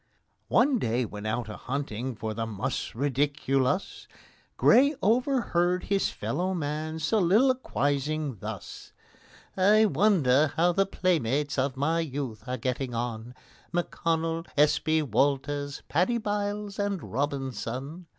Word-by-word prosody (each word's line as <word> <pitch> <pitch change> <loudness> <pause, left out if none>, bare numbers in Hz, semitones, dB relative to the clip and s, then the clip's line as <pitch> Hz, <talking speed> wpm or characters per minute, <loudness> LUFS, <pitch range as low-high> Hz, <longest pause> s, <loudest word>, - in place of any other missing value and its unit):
One 255 0 +3
day, 120 - 0
when 105 0 -7
out 115 +2 -2
a 110 - -6
hunting 130 -2 -4
for 110 +1 -4
the 115 0 -3
mus 105 0 -3
ridiculus, 140 - 0 0.5
GRAY 280 +6 +5
overheard 205 -6 +1
his 200 -1 +1
fellow 185 +5 -2
man 155 0 -3
soliloquizing 155 - +1
thus: 105 -2 -8 0.6
"I 210 +3 +5
wonder 155 -10 +3
how 175 +2 +4
the 195 +2 +1
playmates 145 -7 0
of 130 0 -1
my 160 +5 +1
youth 135 -8 -4
are 125 0 -2
getting 125 +1 -3
on, 120 +1 -4 0.4
M'CONNELL, 165 -1 -1
S. 150 0 +4
B. 155 0 +1
WALTERS, 145 +1 0
PADDY 180 +10 +1
BYLES, 205 -1 -3
and 200 -3 -1
ROBINSON?" 135 - -4
150 Hz, 120 wpm, -27 LUFS, 130-185 Hz, 0.6 s, GRAY